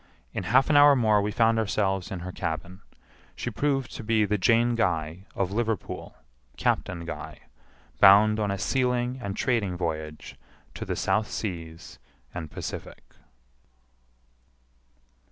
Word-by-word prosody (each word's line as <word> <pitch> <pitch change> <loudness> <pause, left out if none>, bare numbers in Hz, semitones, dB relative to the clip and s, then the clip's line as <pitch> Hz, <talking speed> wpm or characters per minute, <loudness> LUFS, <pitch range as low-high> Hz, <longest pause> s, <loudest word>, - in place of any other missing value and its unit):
In - - -4
half 130 +7 +4
an - - +3
hour 145 0 +8
more 110 -4 +3
we 105 +1 -1
found 115 +1 +3
ourselves 95 -3 0
in 95 -3 -5
her 90 +1 -6
cabin. 85 +3 -5 0.5
She - - -4
proved 135 -3 -1
to - - -7
be 110 -1 +2
the 105 0 -1
Jane 115 +4 +3
Guy, 85 -5 -1
of 95 -1 -1
Liverpool, 110 -1 -3 0.4
Captain 85 -2 -1
Guy, - - -7 0.6
bound 105 +2 +7
on 105 -1 0
a 100 - -1
sealing 125 +3 0
and 100 -3 -5
trading 105 -8 0
voyage 80 -3 -5 0.4
to - - -6
the - - -2
South 110 0 0
Seas 85 -5 -6 0.3
and 80 -3 -6
Pacific. - - -8
105 Hz, 135 wpm, -26 LUFS, 90-115 Hz, 0.6 s, hour